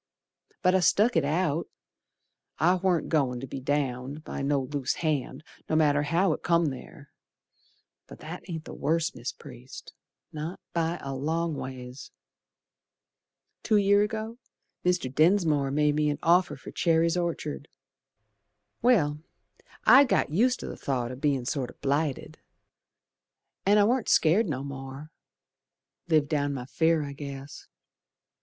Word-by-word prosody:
But 185 0 +4
I 190 - +4
stuck 205 +6 +3
it 165 - +3
out, 160 +2 0 0.9
I 175 +3 +4
warn't 185 -2 +1
goin' 135 -6 +1
to 135 - -6
be 135 - -6
downed 135 +1 -2
By - - -5
no 140 0 +1
loose 135 0 -2
hand, 150 -3 -2 0.3
no 155 - +1
matter 145 -2 +3
how 165 +4 +2
it - - -6
come 170 -3 +2
ther 140 +2 -11 1.0
But - - -11
that 165 +4 -7
ain't 160 -2 -5
the - - -8
worst, 160 +3 0
Mis' - - -4
Priest, - - -12 0.4
Not 155 +4 -5
by 170 0 0
a 135 - -4
long 160 +5 -1
ways. 130 -1 -8 1.5
Two 215 - +2
year 200 0 +4
ago, 220 +2 -3 0.4
Mr. 180 -8 0
Densmore 155 -3 +3
made 150 +1 +2
me 150 0 +1
an 145 - -1
offer 180 +2 +3
for - - -11
Cherry's 165 0 +2
Orchard. 165 -4 -3 1.1
Well, 155 -12 +3 0.7
I'd 275 +2 +8
got 245 - +1
used 245 +10 +2
to - - -6
th' - - -18
thought 125 -3 -2
o' - - -6
bein' 135 -2 0
sort 130 -1 -2
o' - - -13
blighted, 140 0 -2 1.3
An' 205 +1 +5
I 205 - +6
warn't 240 +3 +1
scared 175 +6 +4
no 135 -2 -3
more. 135 +2 -8 1.0
Lived 155 -3 +2
down 145 -2 0
my 125 -2 -5
fear, 160 +4 +1
I 140 -1 -6
guess. 140 -1 -9
155 Hz, 145 wpm, -27 LUFS, 140-175 Hz, 1.5 s, I'd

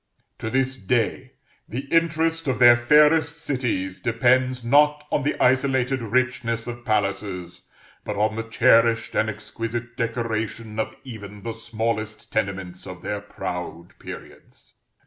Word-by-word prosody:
To 110 - -3
this 130 +1 0
day, 125 +5 -1 0.4
the 120 +5 -3
interest 165 -1 +1
of 130 - +1
their 120 -1 +8
fairest 150 +6 +4
cities 125 - -2
depends, 125 +2 +2
not 150 +4 +4
on - - +2
the 145 - 0
isolated 130 0 +2
richness 120 0 0
of 120 0 -7
palaces, 100 -5 -2 0.4
but - - -4
on 110 +1 +1
the 115 - -2
cherished 115 0 +4
and 110 - +1
exquisite 115 +2 -5
decoration 115 -2 -3
of 110 - -2
even 105 -5 -9
the 115 - -3
smallest 110 -1 -4
tenements 95 -4 -3
of 90 -1 -9
their 105 -1 -3
proud 90 -1 -6
periods. - - -12
115 Hz, 130 wpm, -24 LUFS, 110-130 Hz, 0.4 s, their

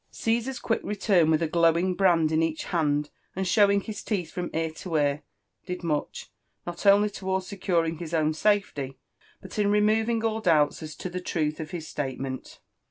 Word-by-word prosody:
Caesar's 235 +3 -1
quick 225 - -1
return, 195 -5 +2
With 160 +1 +3
a - - +1
glowing 170 +3 +3
brand 175 -4 +3
in 160 0 +2
each 160 -1 -1
hand, 150 -3 0 0.2
and 190 0 -1
showing 200 +1 +4
his 210 0 -6
teeth 180 -7 -2
from 180 -1 -4
ear 160 0 -1
to 165 +1 -6
ear, 145 -1 +1 0.5
did 180 0 -5
much, 150 -3 -3 0.3
not 175 +3 -4
only 200 +1 +6
towards 190 -2 -3
securing 170 -5 -1
his 165 -2 -6
own 155 -2 +1
safety, 155 -8 0 0.5
but 190 +2 -7
in 205 -1 +3
removing 220 +2 +2
all 220 0 0
doubts 155 -6 +3
as 155 -1 -7
to 185 - -5
the 180 +1 -4
truth 155 -3 -1
of 155 -1 -5
bis 160 -2 -6
state 135 -3 -4
ment. 130 -1 -6
175 Hz, 185 wpm, -26 LUFS, 155-200 Hz, 0.5 s, only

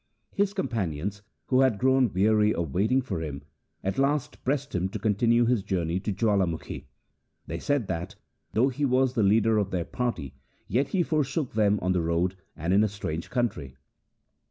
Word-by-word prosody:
His 200 0 0
companions, 100 - -2 0.2
who 130 - +2
had 130 -6 +3
grown 130 -1 +3
weary 105 +3 +3
of 80 -5 -3
waiting 125 +8 +2
for 100 -9 -3
him, 70 -3 -5 0.4
at 95 +5 -1
last 140 0 0
pressed 135 +1 -1
him 90 0 0
to 100 - -4
continue 115 +3 +2
his 120 -3 +2
journey 90 -2 -1
to 105 - -3
J 110 +4 -1
awalamukhi. 95 -6 0 0.6
They - - -5
said 145 -5 0
that, 90 +5 -4 0.4
though 125 +5 +3
he 140 +3 -4
was 130 -1 +3
the 120 - +1
leader 110 +2 +4
of 100 -2 -1
their 90 -4 -2
party, 115 - -3 0.3
yet 130 +7 +1
he 175 +5 +1
forsook 150 -3 -1
them 105 -1 +3
on 90 - +1
the 90 -2 +1
road 85 +3 0 0.2
and 85 +4 -1
in 100 +2 +5
a - - +3
strange 85 -5 -5
country. 95 - -2
105 Hz, 180 wpm, -27 LUFS, 90-130 Hz, 0.6 s, in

